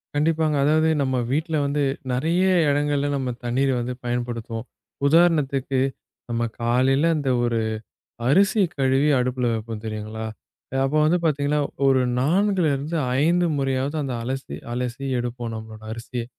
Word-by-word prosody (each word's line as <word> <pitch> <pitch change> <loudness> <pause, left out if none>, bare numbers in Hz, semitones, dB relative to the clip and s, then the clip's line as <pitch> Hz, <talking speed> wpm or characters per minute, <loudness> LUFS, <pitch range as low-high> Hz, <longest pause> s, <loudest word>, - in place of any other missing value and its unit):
கண்டிப்பாங்க. 155 0 +2
அதாவது 155 +2 +3
நம்ம 130 -1 0 0.2
வீட்டுல 155 +2 0
வந்து 145 +1 0 0.3
நறைய 165 +9 +1 0.3
இடங்கள்ல 145 0 +1
நம்ம 130 -2 -2 0.2
தண்ணீர் 135 +3 +1
வந்து 125 +1 -3
பயன்படுத்துவோம். 120 -1 -3 0.4
உதாரணத்துக்கு, 140 -5 +3 0.5
நம்ம 120 0 -1 0.2
காலையில 130 +6 +3
அந்த 140 -3 -1
ஒரு 115 -1 +1 0.7
அரிசி 195 +7 +4 0.2
கழுவி 135 +2 +3
அடுப்புல 125 -1 0
வெப்போம் 110 0 -5
தெரியுங்களா? 110 0 -5 0.6
அப்போ 140 +3 0
வந்து 175 +3 +3
பாத்தீங்கன்னா, 145 -1 +1 0.3
ஒரு 135 -1 +4 0.2
4 185 +6 +2
இருந்து 150 +5 -3 0.3
5 175 +2 +3
முறையாவது 135 +2 -1
அந்த 135 -3 -3
அலசி, 135 +3 -4 0.2
அலசி 125 +2 -3
எடுப்போம் 120 -1 -4
நம்மளோட 110 0 -9
அரிசியை. 115 +1 -5
135 Hz, 130 wpm, -23 LUFS, 120-150 Hz, 0.7 s, அரிசி